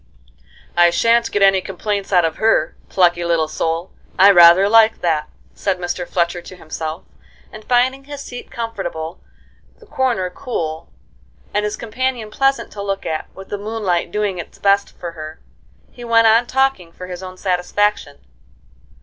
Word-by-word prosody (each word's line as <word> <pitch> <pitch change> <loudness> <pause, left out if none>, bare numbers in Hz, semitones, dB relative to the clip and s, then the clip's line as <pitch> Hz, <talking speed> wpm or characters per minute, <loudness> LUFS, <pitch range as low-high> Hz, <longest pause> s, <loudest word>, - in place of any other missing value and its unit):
"I 175 0 +6
shan't 230 +6 +2
get 205 - +1
any 195 -1 +5
complaints 200 +2 -4
out 180 -3 +4
of 160 - -2
her. 220 -8 +2
Plucky 175 -2 +2
little 165 -2 +1
soul! 165 +3 -3 0.3
I 195 +2 +8
rather 175 +1 +7
like 225 +1 +4
that," 160 -3 0 0.2
said 195 -2 -1
Mr. 175 0 -4
Fletcher 175 0 -1
to 185 - -12
himself; 160 -1 -6 0.5
and, 215 - -10
finding 255 +3 +1
his 285 0 -8
seat 245 - -9
comfortable, 180 -8 -5 0.6
the 450 - -18
corner 255 - -1
cool, 165 - -5 0.6
and 210 - +1
his 210 0 -3
companion 230 -1 -3
pleasant 270 +4 0
to 205 - -7
look 195 -1 -3
at, 155 -1 -3
with 195 0 -11
the 205 - -4
moonlight 205 -5 -2
doing 205 -3 -1
its 170 - -9
best 200 0 +2
for 170 -1 -6
her, 155 -1 -9 0.5
he 245 - -12
went 230 -1 +4
on 225 +2 +4
talking 265 -11 0
for 180 - -9
his 180 0 -7
own 185 0 -9
satisfaction. 180 -3 -1
195 Hz, 160 wpm, -19 LUFS, 175-225 Hz, 0.6 s, I